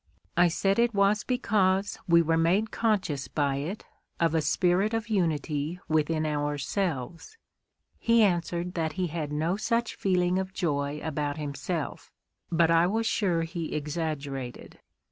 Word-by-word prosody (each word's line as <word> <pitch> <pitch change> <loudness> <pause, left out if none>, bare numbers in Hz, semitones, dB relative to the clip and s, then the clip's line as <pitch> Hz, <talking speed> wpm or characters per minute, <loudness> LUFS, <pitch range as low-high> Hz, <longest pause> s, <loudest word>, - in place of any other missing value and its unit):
I 175 +1 +5
said 195 +5 +1
it 235 -2 +2
was 200 +1 +3
because 200 -6 +1
we 170 -1 +5
were 165 0 +2
made 180 +7 +2
conscious 185 - 0
by 140 -1 0
it 165 +10 -5 0.3
of 165 -1 +2
a 160 - +2
spirit 185 +7 +2
of 225 -1 -3
unity 160 -4 -1
within 155 0 +1
ourselves. 150 - -2 0.6
He 230 -1 +4
answered 175 -2 0
that 160 -2 -1
he 185 -1 -1
had 155 -4 -3
no 160 +5 0
such 230 +2 0
feeling 180 -1 +1
of 190 0 -4
joy 145 -4 -1
about 150 -2 -2
himself, 150 +2 -4 0.4
but 165 0 +3
I 165 +1 +5
was 225 +4 0
sure 180 -7 +1
he 165 -1 -4
exaggerated. 145 -4 -4
170 Hz, 145 wpm, -28 LUFS, 150-195 Hz, 0.6 s, I